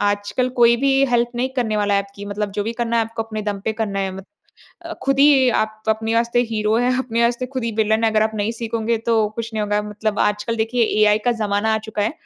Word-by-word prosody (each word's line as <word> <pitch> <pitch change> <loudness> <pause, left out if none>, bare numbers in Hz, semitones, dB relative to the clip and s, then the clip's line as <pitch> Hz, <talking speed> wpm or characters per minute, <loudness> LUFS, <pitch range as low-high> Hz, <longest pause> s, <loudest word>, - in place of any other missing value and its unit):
आजकल 205 +5 0
कोई 235 0 +6
भी 275 -1 +3
हेल्प 240 -1 +1
नहीं 255 +2 0
करने 220 -4 0
वाला 205 -1 +1
है 200 - +2
आपकी 200 0 -11
मतलब 205 0 -3
जो 205 - -2
भी 230 - -2
करना 235 -1 -1
है 225 - +2
आपको 225 0 -5
अपने 215 -1 -6
दम 205 -1 -3
पे 220 - 0
करना 210 -3 -2
है 190 -1 -2
मत 190 - -9 0.6
अ, 335 - -6
ख़ुद 275 0 +2
ही 275 -3 +6
आप 215 -1 -1
अपने 220 +1 0
वास्ते 235 +1 +2
हीरो 215 0 +1
हैं 250 +1 +1
अपने 235 -2 -1
वास्ते 240 +2 0
ख़ुद 255 -3 -2
ही 230 - -2
विलन 220 +1 +2
है, 220 - +3
अगर 215 0 +2
आप 220 0 0
नहीं 210 +2 -1
सीखोंगे 230 0 -2
तो 220 -2 +2
कुछ 230 0 -5
नहीं 215 - -1
होगा 210 0 0
मतलब 210 0 -3
आजकल 210 +3 0
देखिए 225 +2 +1 0.2
एआई 210 0 +5
का 245 - +4
ज़माना 205 +2 +1
आ - - +1
चुका 210 -1 -2
है। 220 - 0
220 Hz, 255 wpm, -20 LUFS, 210-235 Hz, 0.6 s, कोई